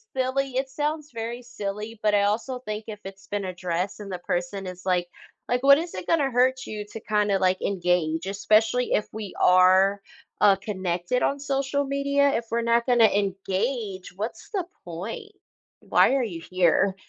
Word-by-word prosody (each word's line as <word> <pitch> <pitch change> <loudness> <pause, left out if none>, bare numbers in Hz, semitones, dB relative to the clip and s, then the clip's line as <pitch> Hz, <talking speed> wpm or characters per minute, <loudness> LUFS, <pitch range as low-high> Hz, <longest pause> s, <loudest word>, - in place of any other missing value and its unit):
silly. 265 +1 0
It 270 0 -1
sounds 300 +2 -3
very 230 +2 -5
silly, 215 -2 -6
but, 210 - +3
I 200 - +3
also 230 +5 -1
think 215 -3 -6
if 210 -1 -7
it's 195 0 -10
been 205 -1 -3
addressed 180 +1 -3
and 200 -2 -7
the 180 - -4
person 175 +2 -3
is 180 0 -9
like 180 -2 +1 0.4
like, 245 +1 0
what 280 0 +8
is 335 +2 -4
it 185 - -6
gonna 295 -5 +2
hurt 255 +1 +2
you 210 -1 -5
to - - -6
kinda, 210 -2 +1
like, 185 0 +2
engage, 175 -3 0
especially 215 +5 +2
if 210 - +1
we 215 -2 -6
are, 185 +2 +5 0.4
uh, 200 -2 +7
connected 185 +2 -2
on 280 - +1
social 275 0 -1
media. 280 0 +2
If 230 - -1
we're 235 +1 +1
not 235 0 +2
gonna 245 -3 +5
engage, 200 +1 -1
what's 220 +2 -5
the 385 -5 -1 0.2
point? 200 - -7 0.5
Why 270 - +4
are 275 - +2
you 175 -8 -5
here? 185 +2 +2
210 Hz, 175 wpm, -25 LUFS, 190-255 Hz, 0.5 s, what